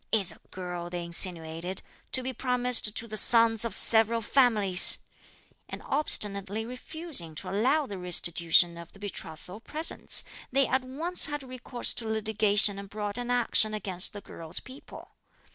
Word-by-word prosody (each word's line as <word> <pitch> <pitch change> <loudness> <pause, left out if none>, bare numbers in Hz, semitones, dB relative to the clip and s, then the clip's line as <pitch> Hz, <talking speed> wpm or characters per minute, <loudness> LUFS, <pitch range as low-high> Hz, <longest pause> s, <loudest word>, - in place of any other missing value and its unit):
'Is 200 -6 +3
a - - -15
girl,' 180 -2 -7
they 175 -1 -5
insinuated, 170 0 0 0.3
'to 260 - +1
be 260 +1 -5
promised 250 -4 +1
to 230 - -1
the 215 -1 -6
sons 230 0 +5
of 230 -4 0
several 225 0 +2
families!' 210 -7 +5 0.7
And - - -9
obstinately 210 -7 -1
refusing 250 - -6
to - - -6
allow 265 +10 +1
the 200 -7 -8
restitution 170 -1 +3
of 170 -1 -13
the 195 - -17
betrothal 185 -1 -7
presents, 310 +7 0 0.3
they 270 +1 +2
at 260 - 0
once 320 +9 +1
had 295 -2 -5
recourse 255 -1 -3
to 225 - -4
litigation 215 -2 +1
and 200 0 -10
brought 210 +2 -5
an 245 0 -6
action 230 -3 +1
(against 190 -3 -5
the 205 - -10
girl's 165 -4 -5
people.) 260 +2 -14
215 Hz, 155 wpm, -27 LUFS, 185-250 Hz, 0.7 s, sons